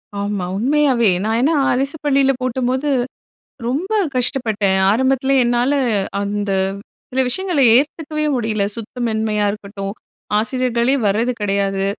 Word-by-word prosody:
ஆமா, 200 -2 -2
உண்மையாவே. 260 -1 +2
நான் 220 +1 0
ஏன்னா, 310 +5 +2 0.2
அரசு 275 +4 -1
பள்ளியில 275 -1 +3
போட்டப்போது 255 +3 -1 0.8
ரொம்ப 345 - -2 0.2
கஷ்டப்பட்டேன். 220 -7 +1
ஆரம்பத்துல 265 +3 +1
என்னால 240 +3 +1 0.5
அந்த 205 0 -2 0.6
சில 260 - 0
விஷயங்கள 360 +1 -1 0.2
ஏத்துக்கவே 305 +2 -1
முடியல. 220 -4 0
சுத்தமின்மையா 220 -2 -2
இருக்கட்டும். 200 -1 -6 0.5
ஆசிரியர்களே 245 +2 0
வரது 225 +5 +1
கெடயாது. 195 -1 0
240 Hz, 105 wpm, -19 LUFS, 210-270 Hz, 0.8 s, பள்ளியில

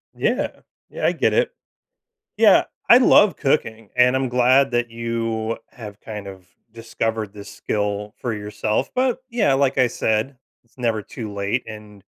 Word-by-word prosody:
Yeah. - - -1 0.3
Yeah, - - -4
I - - +4
get - - +1
it. - - +2 0.9
Yeah, - - +6 0.3
I 240 - +10
love 210 -5 +5
cooking, 115 -7 -1
and 125 +1 +4
I'm 130 -1 0
glad 130 +2 +3
that 120 -1 0
you 115 -1 -3
have 105 -4 -10
kind 105 -2 -7
of 95 -2 -11 0.2
discovered 115 -2 -3
this 100 -1 -10
skill 105 0 -3
for 120 -3 -3
yourself, 105 +1 -2
but, 255 0 +1
yeah, 220 - +2
like 135 0 +1
I 130 -1 +4
said, 110 +4 -1 0.3
it's 115 - -35
never 115 -3 -1
too 110 -1 -8
late, 100 +5 -2
and, 105 -2 -11
115 Hz, 160 wpm, -21 LUFS, 105-130 Hz, 0.9 s, I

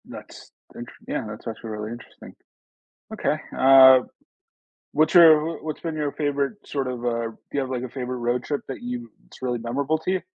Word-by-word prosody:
That's - - -12 0.2
thanks - - -9
again, - - -3
that's 105 +3 -9
actually 115 0 -6
really 105 +1 -5
interesting. 120 +1 -12 0.8
Okay, 210 - 0 0.2
uh, 130 -1 +8 0.9
what's 155 +4 +2
your 165 -2 +6
what's 155 -1 -5
been 165 -2 -4
your 150 -2 -2
favorite, 145 +2 -1
sort 135 -3 -3
of 125 -1 -5
uh, 115 -1 -1
do 115 - -13 0.2
you 140 - 0
have, 130 -1 -4
like, 125 -2 -3
a 130 - -5
favorite 125 0 -5
road 120 0 -1
trip 145 - -3
that 135 - -7
you 120 -1 -6 0.2
it's - - -17
really 125 -1 -1
memorable 135 +7 -1
to 170 +4 -2
you? 190 - -1
130 Hz, 190 wpm, -24 LUFS, 120-150 Hz, 0.9 s, uh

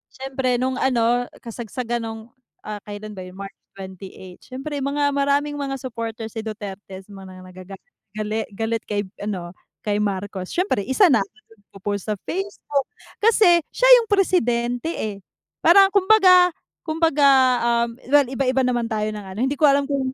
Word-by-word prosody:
siyempre 260 -2 -1
nung 260 +1 -1
ano 245 -1 +1 0.2
kasagsagan 235 +1 -4
nung 225 -1 -6 0.4
ah, 210 -1 -6
kailan 210 +1 -7
ba 190 - -8
yon? 185 0 -12
March 195 0 -8 0.2
28 190 -1 -10
siyempre, 275 +3 -6
mga 285 +1 0
maraming 285 +1 0
mga 275 -1 -3
supporters 230 -3 -6
si 225 - -5
Duterte 200 -3 -8
mga 190 -1 -11
nagaga 185 +1 -11 0.4
gali 215 +1 -3
galit 225 +1 -1
kay 205 0 -1 0.2
ano 185 -4 -4 0.3
kay 205 0 0
Marcos, 195 -2 -3
siyempre 360 - 0
isa 330 +5 +4
na 230 - +5
ako 195 - -5
do'n 215 - -28
sa 225 - -22
nag - - -43
po-post 200 0 -3
sa 210 - 0
Facebook. 345 -7 -3 0.4
Kasi 410 -6 +5
siya - - 0 0.2
yung 450 - -9
presidente 245 - +1
eh, 210 -2 -3 0.5
parang 390 +3 +6
'kumbaga 375 -3 +6 0.3
'kumbaga 315 -3 +2 0.6
um, - - -7 0.2
well, 290 -1 +5
iba-iba 260 0 0
naman 240 -2 0
tayo 215 -1 -1
ng 210 - -6
ano, 190 +2 -9
hindi 275 - 0
ko 300 - +6
alam 280 0 +3
kung, 275 -2 -1
240 Hz, 165 wpm, -22 LUFS, 205-285 Hz, 0.6 s, parang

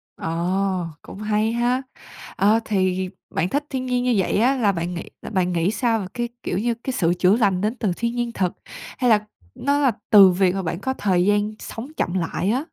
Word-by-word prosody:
Ờ, 180 +2 -1
cũng - - -11
hay 215 +1 +1
ha! 245 +2 +1 0.5
Ờ, 215 +3 +4
thì 185 -2 0 0.2
bạn 175 +3 -1
thích 290 +5 -1
thiên 260 -1 -3
nhiên 250 -1 0
như 250 - +2
vậy 190 - +1
á, 250 +5 +3
là 215 -5 +3
bạn 170 -1 -3
nghị 170 - -6
là - - -7
bạn 185 -3 0
nghĩ 170 +3 +1
sao 230 -1 +1
về 195 - -5
cái 240 -1 -2
kiểu - - -2
như, 235 +4 0
cái 265 - -2
sự 175 -6 +2
chữa 185 +2 +5
lành 195 -5 +2
đến 215 +4 0
từ 210 -6 0
thiên 235 +1 -2
nhiên 240 -1 -1
thực? 185 -5 -1 0.4
Hay 250 -3 +2
là, 215 -1 +4 0.3
nó 280 +2 +1
là 270 -3 +3 0.2
từ 200 -3 +9
việc 185 0 +2
mà 195 - -1
bạn 170 0 -3
có 260 +5 -2
thời 185 -7 +1
gian 205 +1 +2
sống 230 +4 -7
chậm 175 - -1
lại 185 +1 -1
á? 245 - +2
205 Hz, 225 wpm, -22 LUFS, 185-240 Hz, 0.5 s, từ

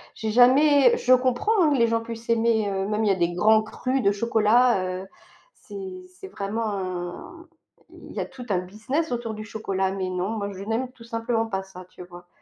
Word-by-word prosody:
j'ai 220 -1 -3
jamais 260 +2 +5
je 255 - +3
comprends, 255 - +2
hein, 300 - +3
que - - +1
les 235 -1 +4
gens 230 0 0
puissent 230 0 -9
aimer, 225 -2 +2
heu, 195 0 -2
même 215 +1 -1
il - - +1
y - - +4
a - - +2
des 175 -1 0
grands 215 +4 +4
crus 255 +4 -2
de 200 - +4
chocolat, 225 0 +3 0.2
heu, 190 - -11 0.5
c'est 375 -2 -9
c'est 370 +1 -12
vraiment 215 - -3
un, 185 - -6 0.4
il - - -13
y - - -5
a - - -1
tout 250 -2 -11
un 185 -3 +1
business 215 - -3
autour 235 -2 -3
du 215 0 -7
chocolat, 195 -4 -2
mais 190 -1 -3
non, 185 +2 -2
moi, 200 -1 -3
je 190 +1 -8
n'aime 235 +4 -2
tout 240 -2 -16
simplement 230 0 -2
pas 190 -3 -3
ça, 185 -1 -12
tu 180 - -11
vois. 175 0 -13
225 Hz, 220 wpm, -24 LUFS, 195-250 Hz, 0.5 s, jamais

